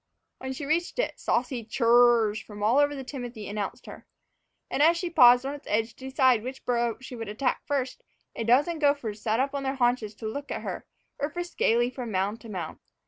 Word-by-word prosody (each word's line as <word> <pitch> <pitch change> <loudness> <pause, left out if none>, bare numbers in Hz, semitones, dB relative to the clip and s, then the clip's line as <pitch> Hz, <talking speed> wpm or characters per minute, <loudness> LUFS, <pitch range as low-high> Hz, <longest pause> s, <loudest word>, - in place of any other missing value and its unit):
When 260 0 -5
she 280 +2 -6
reached 330 - 0
it, - - -1
saucy 245 -1 -1
chur 230 +2 -2 0.4
r 215 - +1
rs 215 - -5
from 210 -1 -9
all 235 +6 +4
over 290 0 +3
the 270 - -6
timothy 245 -5 -7
announced 205 -1 -4
her. - - -11 0.6
And 280 - -1
as 330 +3 +5
she 345 0 -3
paused 245 -4 +7
on 275 - -2
its 290 - -10
edge 225 +2 0
to 265 0 -8
decide 260 -4 +4
which 255 +3 -7
burrow 235 -2 0
she 255 -1 -8
would 225 -3 -6
attack 250 +5 -1
first, 270 -3 -2 0.3
a - - -3
dozen 285 +8 +3
gophers 280 -8 0
sat 220 +1 0
up 275 +2 0
on 280 - -2
their 270 0 -2
haunches 240 -4 0
to 220 - -9
look 285 +6 -5
at - - -4
her, - - -5 0.3
or 285 - -1
frisked 350 +3 -6
gaily 240 +2 +3
from 250 -2 -6
mound 200 +3 -1
to 230 - -11
mound. 180 -6 -5
250 Hz, 225 wpm, -27 LUFS, 220-280 Hz, 0.6 s, paused